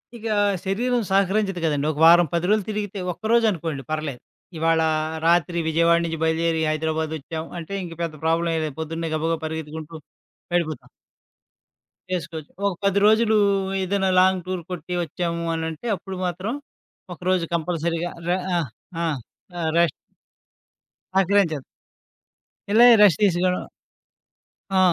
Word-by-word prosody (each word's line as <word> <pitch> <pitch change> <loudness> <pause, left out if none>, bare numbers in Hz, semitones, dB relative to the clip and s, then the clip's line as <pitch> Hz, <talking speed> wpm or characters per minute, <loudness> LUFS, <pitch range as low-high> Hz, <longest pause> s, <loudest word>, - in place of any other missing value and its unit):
ఇకా 225 -1 -3 0.3
శరీరం 240 +6 0
సహకరించదు 195 -1 +1
కదండీ! 150 -2 0
ఒక 150 - -8
వారం 175 0 +7 0.2
రోజులు 215 -1 +3
తిరిగితే 205 -2 -3
ఒక్కరోజనుకోండి 195 -9 0
పర్లేదు. 155 -5 -3 0.4
ఇవాళ 165 0 +2 0.5
రాత్రి 170 0 +3
విజయవాడ 170 +1 +3
నుంచి 165 -1 -3
బయలుదేరి 160 0 +1
హైదరాబాదొచ్చాం. 160 0 -3
అంటే, 170 +4 -7
ఇంక 170 -2 -7
పెద్ద 165 - -3
ప్రాబ్లమేం 165 0 +1
లేదు. 150 -3 -6
పొద్దున్నే 165 +1 -3
గబ్బగా 165 +1 0
పరిగెత్తుకుంటూ 160 0 -6 0.6
వెళిపోతాం. 160 -3 -2 1.3
చేసుకోవచ్చు. 160 -3 -5 0.2
ఒక 195 - 0
10 200 0 +3
రోజులు 220 0 +4 0.5
ఏదైనా 190 0 0
లాంగ్ 185 -1 +3
టూర్ 185 -2 -3
కొట్టి 180 0 -5
వచ్చాము 170 +1 -3
అనంటే 160 +7 -4
అప్పుడు 190 0 -8
మాత్రం, 185 +6 -3 0.6
ఒకరోజు 180 0 0
కంపల్సరీగా 170 +1 -2 0.2
రే 180 - +3 0.2
ఆ! - - +2 0.5
ఆ! - - +1 0.5
ఆ! 170 - -3 0.2
రష్ 170 -4 +3 1.2
సహకరించదు. 190 -6 +2 1.1
ఎళ్ళెక 240 +3 +8
రెస్టు 195 -7 +6
తీసుకోవడం 180 -1 +1 1.1
ఆ! 190 - +5
170 Hz, 120 wpm, -23 LUFS, 160-190 Hz, 1.3 s, ఎళ్ళెక